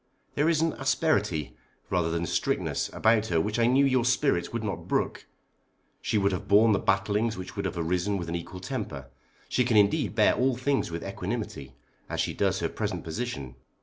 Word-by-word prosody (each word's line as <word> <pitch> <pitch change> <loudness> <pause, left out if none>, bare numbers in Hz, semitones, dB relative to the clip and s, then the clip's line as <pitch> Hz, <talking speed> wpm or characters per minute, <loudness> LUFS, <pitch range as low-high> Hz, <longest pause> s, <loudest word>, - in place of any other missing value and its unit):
There 150 +3 +2
is 160 -2 +2
an 165 - +1
asperity, 135 - 0 0.4
rather 90 -3 +1
than 85 +1 -1
strictness, - - -1
about 110 -1 +2
her 85 -4 +1
which 105 +7 -1
I 115 - +4
knew 135 +3 +4
your 130 -3 +3
spirit 125 -6 +1
would 115 -1 -3
not 105 -3 -4
brook. - - -1 0.7
She 110 - 0
would 100 0 +2
have 90 - -4
borne 110 +3 +6
the 100 - +3
battlings 100 +3 +1
which 95 - -7
would - - -3
have - - -3
arisen 90 +4 0
with 85 -3 -5
an 85 - -4
equal 90 +2 -6
temper. 80 - -5 0.4
She 125 - +1
can 120 -3 +2
indeed 100 +1 +3
bear 110 -1 +5
all 130 0 +1
things 135 -2 0
with 85 0 -5
equanimity 65 -1 -5 0.3
as - - -3
she - - 0
does - - 0
her - - +1
present - - -3
position. 80 - -4
105 Hz, 195 wpm, -27 LUFS, 85-125 Hz, 0.7 s, borne